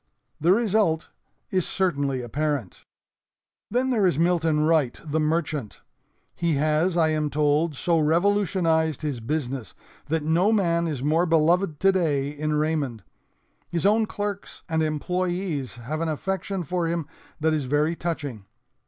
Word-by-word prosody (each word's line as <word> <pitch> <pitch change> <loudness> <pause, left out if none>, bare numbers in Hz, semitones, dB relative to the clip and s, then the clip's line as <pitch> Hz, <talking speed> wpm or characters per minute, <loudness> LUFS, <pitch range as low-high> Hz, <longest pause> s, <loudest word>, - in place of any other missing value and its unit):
The 170 +4 +3
result 205 -6 +2 0.4
is 185 -2 +2
certainly 140 -9 0
apparent. 145 -4 -2 0.9
"Then 255 +2 +1
there 210 -6 +3
is 170 - +1
Milton 165 -2 +2
Wright, 155 -7 +2
the 155 +1 -1
merchant. 155 -6 -1 0.5
He 170 -2 0
has, 155 +5 +1
I 160 -2 +4
am 155 -1 0
told, 150 +2 +1
so 165 +4 +1
revolutionized 165 -2 +2
his 145 -5 -2
business 130 - -3 0.3
that 160 +1 0
no 170 +7 +3
man 170 -5 +2
is 145 -5 -3
more 160 +4 +2
beloved 165 +1 +2
today 165 -8 +2
in 150 +1 -2
Raymond. 150 -8 -1 0.7
His 170 +2 -2
own 215 +2 +4
clerks 205 0 -5
and 160 -2 0
employees 175 -2 -2
have 135 +7 -5
an 165 - 0
affection 190 +4 -2
for 175 +2 -1
him 165 -1 -1 0.3
that 160 +1 +2
is 150 -3 -1
very 150 +5 +1
touching. 145 - -4
160 Hz, 140 wpm, -25 LUFS, 150-180 Hz, 0.9 s, I